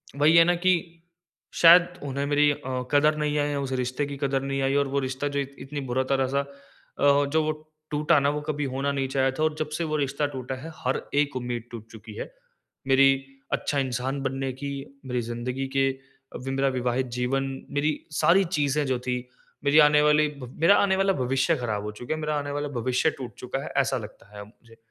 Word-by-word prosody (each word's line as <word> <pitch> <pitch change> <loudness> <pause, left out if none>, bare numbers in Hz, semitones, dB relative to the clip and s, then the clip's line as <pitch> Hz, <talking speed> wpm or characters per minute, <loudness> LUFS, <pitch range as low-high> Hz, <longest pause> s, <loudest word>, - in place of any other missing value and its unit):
वही 150 +3 +4
है 165 - +9
ना, 175 +1 +3
कि 170 -2 0 0.6
शायद 175 +1 +8 0.2
उन्हें 140 0 -2
मेरी 145 +1 +3
अ, 130 -3 -4
कदर 150 +1 +4
नहीं 150 -1 -1
है, 145 -1 0
उस 135 -1 -4
रिश्ते 130 +4 -2
की 140 0 -6
कदर 135 -1 0
नहीं 135 0 -2
आई। 135 +1 +1
और 140 -1 +2
वो 140 +1 0
रिश्ता 130 +1 -3
जो - - +1
इत 140 0 -5
इतनी 140 +2 -6
बुरा 130 +2 +1
तरह-सा 135 0 +1
अ, 140 0 -1
जो 160 0 +2
वो 155 - 0 0.4
टूटा 150 +1 +3
न 140 - +1
वो 150 - -3
कभी 150 -1 -3
होना 140 +1 0
नहीं 135 -1 -1
चाहिए 135 0 +1
था 155 - +2
और 155 -1 +1
जब 155 - -2
से 170 - -1
वो 155 -1 -1
रिश्ता 140 0 -1
टूटा 130 0 -4
है 165 +3 -8
हर 130 -2 -2 0.2
एक 145 -2 -2
उम्मीद 120 -2 -3
टूट 115 -2 -9
चुकी 110 0 -11
है। - - -6 0.6
मेरी 135 0 +6 0.4
अच्छा 145 - 0
इंसान 130 +1 -2
बनने 135 0 -2
की, 140 +2 -5 0.3
मेरी 125 -1 -1
ज़िंदगी 120 +3 -4
के 135 0 +4 0.5
वि 135 - -3
मेरा 135 +1 +1
विवाहित 125 0 -1
जीवन, 135 +2 0 0.3
मेरी 145 +2 +1 0.3
सारी 190 +3 +5
चीज़ें 145 0 +1
जो 130 -2 0
थी 125 0 0 0.5
मेरी 145 +2 +5
आने 150 0 +6
वाली 150 0 +4
ब 125 -3 -8
मेरा 170 +5 +6
आने 195 -1 +3
वाला 195 0 +2
भविष्य 130 +3 +1
ख़राब 110 -5 -3
हो 105 - -4
चुका 120 +6 -5
है, - - -6
मेरा 150 0 -1
आने 145 0 -4
वाला 145 +1 -2
भविष्य 125 +6 +1
टूट 125 -4 -7
चुका 125 +1 -4
है - - -6
ऐसा 135 -1 +2
लगता 105 -3 -10
है 105 - -7
अब 100 - -10
मुझे। 115 +1 -21
140 Hz, 215 wpm, -26 LUFS, 130-150 Hz, 0.6 s, है